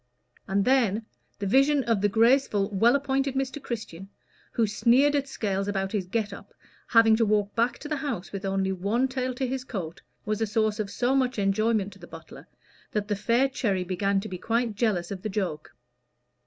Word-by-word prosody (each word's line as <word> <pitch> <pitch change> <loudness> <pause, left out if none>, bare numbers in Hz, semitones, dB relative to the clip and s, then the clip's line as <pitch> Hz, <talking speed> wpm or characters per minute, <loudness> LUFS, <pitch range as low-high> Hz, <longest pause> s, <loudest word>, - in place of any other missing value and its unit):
And 195 0 +1
then 230 -5 +2 0.3
the 205 - -4
vision 275 +6 +3
of 230 -5 +1
the 205 - +3
graceful, 220 -2 +3
well 225 +6 +4
appointed 275 -1 0
Mr. 270 +2 -2
Christian, 195 -7 -6 0.4
who 230 - +2
sneered 250 +7 +3
at 280 -1 0
Scales 200 -6 -2
about 195 -1 -2
his 195 -4 -2
"get 210 0 -2
up," - - -12 0.3
having 225 -1 +5
to 230 - +3
walk 210 -1 +1
back 235 +1 +1
to - - -8
the 300 0 -2
house 265 - -4
with 195 -1 -6
only 195 0 0
one 205 +8 0
tail 255 -1 -2
to 260 +1 -1
his 260 0 -3
coat, 185 -10 -6 0.2
was 215 0 -2
a 225 - +1
source 215 0 0
of 210 -2 -2
so 245 +6 0
much 260 -2 +1
enjoyment 205 0 +1
to 195 - -17
the 175 - -12
butler, 165 -1 -12 0.5
that 210 0 -2
the 205 - +1
fair 230 +6 +2
Cherry 205 -8 -1
began 195 +2 0
to 215 - -6
be 185 -3 -6
quite 230 +1 0
jealous 205 -5 0
of 190 -2 -5
the 215 - -3
joke. 185 -7 -3
215 Hz, 200 wpm, -26 LUFS, 195-250 Hz, 0.5 s, having